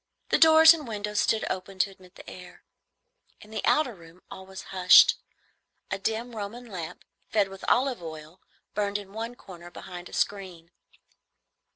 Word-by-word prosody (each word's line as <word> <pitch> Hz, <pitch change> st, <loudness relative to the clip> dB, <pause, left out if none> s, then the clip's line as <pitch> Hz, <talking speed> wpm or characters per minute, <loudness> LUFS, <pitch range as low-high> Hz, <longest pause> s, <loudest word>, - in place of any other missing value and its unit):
The -, -, +2 dB
doors 320 Hz, 0 st, +8 dB
and 305 Hz, -5 st, -7 dB
windows 210 Hz, -1 st, -3 dB
stood 220 Hz, -1 st, +1 dB
open 190 Hz, +1 st, -5 dB
to 195 Hz, +1 st, +1 dB
admit 185 Hz, -1 st, -19 dB
the -, -, -14 dB
air. 180 Hz, -1 st, -12 dB, 0.8 s
In 215 Hz, -, -16 dB
the 220 Hz, -, -4 dB
outer 300 Hz, -6 st, +2 dB
room 170 Hz, -1 st, -17 dB
all 190 Hz, 0 st, -10 dB
was 190 Hz, 0 st, -9 dB
hushed. 180 Hz, -1 st, +7 dB, 0.8 s
A -, -, -2 dB
dim 225 Hz, +4 st, -3 dB
Roman 220 Hz, +4 st, -7 dB
lamp, 180 Hz, -6 st, -8 dB, 0.2 s
fed 205 Hz, -3 st, +1 dB
with 195 Hz, 0 st, -12 dB
olive 255 Hz, -4 st, +1 dB
oil, 160 Hz, +1 st, -10 dB, 0.3 s
burned 205 Hz, 0 st, -1 dB
in 200 Hz, -1 st, -11 dB
one 230 Hz, +2 st, -5 dB
corner 175 Hz, -6 st, -12 dB
behind 175 Hz, 0 st, -10 dB
a -, -, -17 dB
screen. 180 Hz, -4 st, -3 dB
195 Hz, 165 wpm, -27 LUFS, 180-220 Hz, 0.8 s, doors